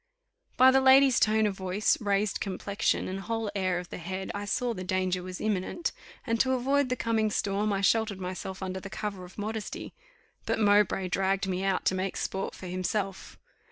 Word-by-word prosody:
'" - - -54
By 260 +1 +8
the 265 0 +4
lady's 265 -1 +6
tone 220 0 +3
of 205 -2 0
voice, 190 +2 +1
raised 205 0 0
complexion, 200 +1 -1
and 190 +1 -4
whole 225 +1 -3
air 185 -3 0
of 180 -1 -7
the - - -6
head, 190 +3 -4
I 205 0 -4
saw 245 +3 0
the 185 -4 -6
danger 185 0 0
was 185 0 -7
imminent, 215 - -1 0.3
and 230 0 0
to 260 +2 +3
avoid 270 +2 +1
the 250 - +1
coming 225 -2 +1
storm, 205 0 0
I 195 -1 0
sheltered 215 -1 +2
myself 185 +1 -5
under 190 0 -3
the 195 - -8
cover 200 -2 -5
of 180 - -15
modesty; 215 0 -5 0.5
but - - +1
Mowbray 205 -3 +3
dragged 195 +1 0
me 185 0 -2
out 195 -1 0
to - - +3
make 185 0 -2
sport 190 0 -3
for - - -10
himself. 185 +2 -3
200 Hz, 195 wpm, -28 LUFS, 185-220 Hz, 0.5 s, By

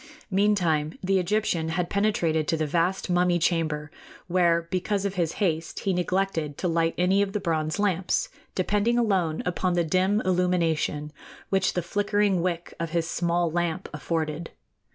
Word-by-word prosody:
Meantime 175 -6 +1
the 190 +1 +2
Egyptian 180 -3 0
had 175 +1 -1
penetrated 170 -6 +1
to 165 - +1
the 155 - 0
vast 170 +5 0
mummy 180 -1 +2
chamber, 160 -3 0 0.3
where, 170 -2 +2
because 195 +2 -1
of 200 - -1
his 170 -4 -1
haste, 165 -5 -1
he 195 - 0
neglected 180 -4 -1
to 185 - -1
light 165 -1 +1
any 185 +3 +3
of 200 -1 -1
the 210 - 0
bronze 155 -4 -1
lamps, 190 -3 +1 0.3
depending 210 +5 +1
alone 190 -9 +1
upon 180 0 0
the 175 -1 +2
dim 185 +5 +2
illumination 170 -5 0 0.4
which 190 -2 +2
the 180 - -1
flickering 205 0 +1
wick 175 -1 -2
of 165 -1 -2
his 165 0 -1
small 170 -1 0
lamp 175 +2 -1
afforded. 160 +1 -3
175 Hz, 155 wpm, -26 LUFS, 165-190 Hz, 0.4 s, any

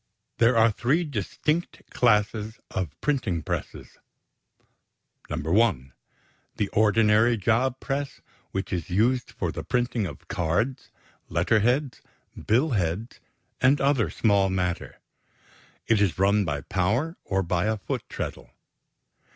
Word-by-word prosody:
= - - -53
There 115 +1 +4
are 115 0 +5
three 135 - +1
distinct 150 - -2
classes 110 -1 +1
of 85 -6 -4
printing 115 - -1
presses: - - -5 1.3
(1) 80 - +1 0.6
The 105 - 0
ordinary 110 +2 +3
job 120 +5 +1
press 140 0 -3 0.3
which 95 +1 -4
is 85 -3 -3
used 115 +6 +1
for - - -3
the - - -5
printing 120 -4 0
of 70 -5 -11
cards, 100 +11 -1 0.4
letter 90 +7 +2
heads, 125 +5 0 0.3
billheads, 110 - 0 0.4
and 135 +3 +4
other 135 - +2
small 100 -1 +2
matter. 90 -2 -2 0.9
It 110 -3 +3
is 100 -5 +1
run 100 +2 +3
by 75 -3 -2
power 110 - 0
or 95 0 0
by 85 +2 0
a 110 0 0
foot 100 - -4
treadle. - - -6
110 Hz, 120 wpm, -26 LUFS, 95-125 Hz, 1.3 s, are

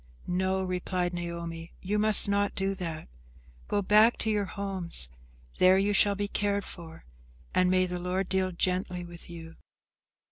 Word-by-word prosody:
"No," 190 +1 0
replied 180 -1 -2
Naomi, 170 -1 -6
"you 205 +3 -1
must 215 0 +6
not 200 0 0
do 195 0 -1
that. 170 -5 -6 0.6
Go 205 - 0
back 215 +4 +5
to 220 - -1
your 205 -1 0
homes, 190 - -2 0.5
there 185 +1 +6
you 200 +1 +1
shall 200 0 +5
be 205 +1 -2
cared 200 -1 -1
for, 165 -2 -10 0.5
and 180 0 +3
may 185 0 +3
the 180 0 -4
Lord 180 +2 -2
deal 190 -1 0
gently 180 0 -1
with 175 0 -11
you." 165 -1 -10
185 Hz, 155 wpm, -28 LUFS, 175-200 Hz, 0.6 s, must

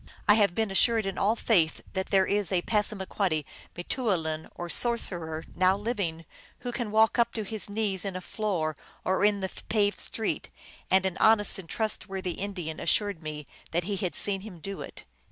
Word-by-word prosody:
I 210 - +8
have 205 -4 +3
been 220 -3 0
assured 225 +2 +3
in 195 -1 -3
all 210 +3 +3
faith 175 -9 +2
that 190 0 -1
there 190 -2 +4
is 205 -1 0
a 180 -2 +1
Passamaquoddy 195 -6 0 0.3
m 175 - -4
te 260 - -1
ou 245 - -1
lin, 160 -1 -3
or 175 - -5
sorcerer, 170 -6 +1
now 185 +1 +3
living, 200 -7 -3 0.4
who 245 0 -3
can 240 -2 -3
walk 220 +3 +4
up 235 0 +3
to 220 - -1
his 215 0 -1
knees 205 -3 -1
in 195 -2 -4
a - - -2
floor 180 -7 -2 0.3
or 190 +2 +1
in 205 -1 +3
the 190 - -2 0.2
paved 205 -2 +2
street, 225 - -1 0.4
and 190 0 +4
an 190 -1 -1
honest 220 -3 +4
and 170 -4 -10
trustworthy 195 -3 -2
In 200 +3 -4
dian 160 -4 -5
assured 200 0 +1
me 150 -1 -6 0.3
that 175 +1 +2
he 200 +3 -2
had 185 -2 -2
seen 195 -2 +1
him 200 -3 -9
do 195 +4 -6
it. - - -8
195 Hz, 200 wpm, -28 LUFS, 175-215 Hz, 0.4 s, I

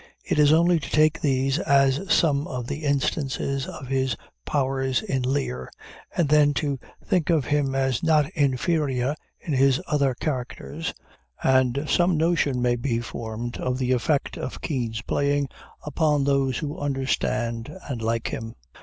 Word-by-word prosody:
It - - 0
is 145 0 +6
only 170 +2 +4
to - - -7
take 155 +1 +3
these 135 0 +1
as 140 +3 +2
some 145 -3 +3
of 125 -3 -4
the 150 +5 -5
instances 140 -1 -1
of 135 - -8
his 130 -3 0 0.3
powers 135 0 0
in 155 -11 -1
Lear, 125 - -2 0.5
and 170 - +3
then 145 -1 +4
to 140 -2 -1 0.3
think 175 -3 +1
of 160 -6 +3
him 145 -1 0
as 130 -2 +1
not 155 -3 +3
inferior 140 -1 +1 0.2
in 155 - -4
his 135 0 +4
other 140 -5 +1
characters, 145 +4 -4 0.5
and 130 +2 +3
some 175 +1 +3
notion 155 -6 +1
may 120 0 +2
be 120 -1 -1
formed 115 0 -5
of 125 0 -1
the 130 -1 0
effect 130 +4 0
of 125 - -5
Kean's 115 -6 -3
playing 145 0 0 0.3
upon 150 -1 +1
those 135 -2 +1
who 150 -2 -4
understand 125 -3 -1 0.2
and 125 -5 -4
like 115 +1 -1
him. 115 0 -6
135 Hz, 155 wpm, -25 LUFS, 125-150 Hz, 0.5 s, is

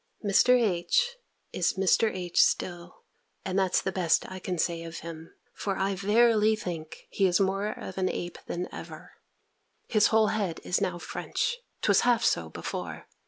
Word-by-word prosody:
Mr. 250 +5 +5
H. 230 - +1 0.4
is 175 - +1
Mr. 195 +3 +3
H. 180 -2 +1
still; 175 0 -1 0.4
and 190 0 0
that's 190 -2 +2
the 190 - -1
best 175 -3 +2
I 185 - -6
can 180 0 -3
say 165 0 -1
of 165 0 -7
him; 165 0 -9 0.2
for 195 -2 -3
I 195 +1 0
verily 215 +2 +3
think, 170 -6 -7
he 195 - +2
is 180 +1 +2
more 195 +1 +1
of 190 -2 -6
an 185 0 +1
ape 175 0 -5
than 175 +1 -3
ever. - - -9 0.8
His 215 -2 +4
whole 220 -2 +3
head 200 -6 -2
is 180 - 0
now 175 -1 -1
French. 480 - -3 0.3
'Twas - - +4
half 240 -1 +2
so 80 -1 +1
before. - - -6
190 Hz, 165 wpm, -28 LUFS, 175-215 Hz, 0.8 s, Mr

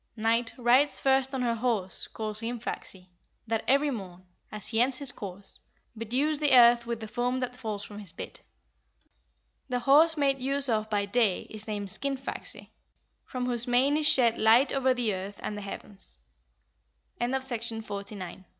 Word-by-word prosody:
Night 225 +1 +1
rides 255 +4 +3
first 265 0 +2
on 265 -2 -2
her 235 -1 +1
horse 225 -5 -2
called 215 -1 -5
Hrimfaxi, 225 -5 -6 0.4
that 225 -1 -1
every 280 +3 +3
morn, 185 -6 -8 0.3
as 210 -1 -5
he 225 0 +2
ends 255 +1 +2
his 280 -2 -1
course, 195 -3 -6 0.4
bedews 260 +7 -1
the 285 -4 +5
earth 235 0 +6
with 235 -1 -3
the 220 - -6
foam 245 +3 -1
that 250 -1 -4
falls 215 -5 -4
from 205 0 -9
his 200 -5 -7
bit. - - -8 1.3
The 250 - 0
horse 310 +5 +5
made 275 -2 +1
use 275 +1 +2
of 215 -1 0
by 205 -2 0
Day 205 -2 +1
is 215 0 -2
named 205 -2 -4
Skinfaxi, 275 +5 -3 0.5
from 255 -2 -4
whose 240 0 0
mane 255 +4 +3
is 300 0 +5
shed 235 -3 +5
light 230 +5 +5
over 265 -1 +2
the 245 -4 0
earth 195 +2 -6
and 210 - -3
the 205 - -6
heavens." 200 0 -5 1.0
OF 240 - 0
THE 265 +1 0
SUN 265 -1 -5 0.3
AND - - -17
MOON. 205 - -4 0.2
11. 185 -4 -7
"How - - -20
240 Hz, 180 wpm, -28 LUFS, 210-265 Hz, 1.3 s, earth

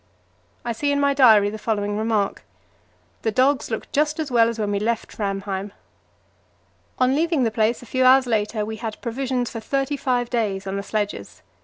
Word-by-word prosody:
I 240 - -1
see 285 +6 -1
in 285 - +1
my 280 0 +3
diary 220 -7 +6
the 215 - -7
following 205 -2 -1
remark: 215 -2 -1 0.8
"The 225 - 0
dogs 260 +4 +2
look 220 - -5
just 300 +2 +1
as 305 -4 -3
well 230 -1 +4
as 230 - -5
when 210 -2 -1
we 200 - 0
left 230 +2 -2
Framheim." 195 -1 -3 1.2
On 255 +1 +3
leaving 320 -1 +1
the 225 - +1
place 220 +2 0
a - - -11
few 255 +3 0
hours 260 +1 +6
later 215 -2 -1
we 220 +1 -5
had 220 -1 -6
provisions 250 0 -2
for 225 - -5
thirty 275 +5 -1
five 245 -3 -1
days 205 -5 -1
on 195 0 -3
the 200 - -2
sledges. 205 0 -4
230 Hz, 190 wpm, -22 LUFS, 210-260 Hz, 1.2 s, diary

